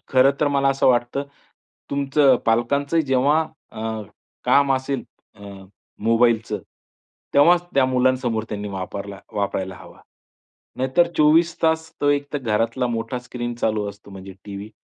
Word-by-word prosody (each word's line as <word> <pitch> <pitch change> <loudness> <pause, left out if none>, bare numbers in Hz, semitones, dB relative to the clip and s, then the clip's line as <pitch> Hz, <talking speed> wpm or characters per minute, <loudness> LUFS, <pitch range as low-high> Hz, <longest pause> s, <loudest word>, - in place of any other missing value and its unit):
खरं 130 +1 +5
तर 150 - +3
मला 140 -1 +2
असं 135 - +1
वाटतं 120 +2 +1 0.7
तुमचं 140 -1 +3
पालकांचं 140 +7 +1
जेव्हा 140 +2 +2 0.3
अ, 110 0 -4 0.4
काम 140 -1 +4
असेल 130 +1 -2 0.3
अ, - - -21 0.6
मोबाईलचं, 115 -1 +2 0.8
तेव्हाच 175 +5 +6
त्या 135 -1 +4
मुलांसमोर 125 -3 +1
त्यांनी 105 0 -4
वापरला, 100 +1 -6
वापरायला 95 -2 -2
हवा. - - -14 0.8
नाहीतर 135 +7 +2
24 160 +3 +4
तास 160 0 +1
तो 145 - +2
एक 145 0 0
तर 145 - -1
घरातला 115 +1 0
मोठा 115 +1 -3
स्क्रीन 120 -1 -5
चालू 110 -3 -1
असतो 100 0 -16
म्हणजे 95 0 -10
टीव्ही 100 +1 -8
125 Hz, 135 wpm, -22 LUFS, 110-140 Hz, 0.8 s, तेव्हाच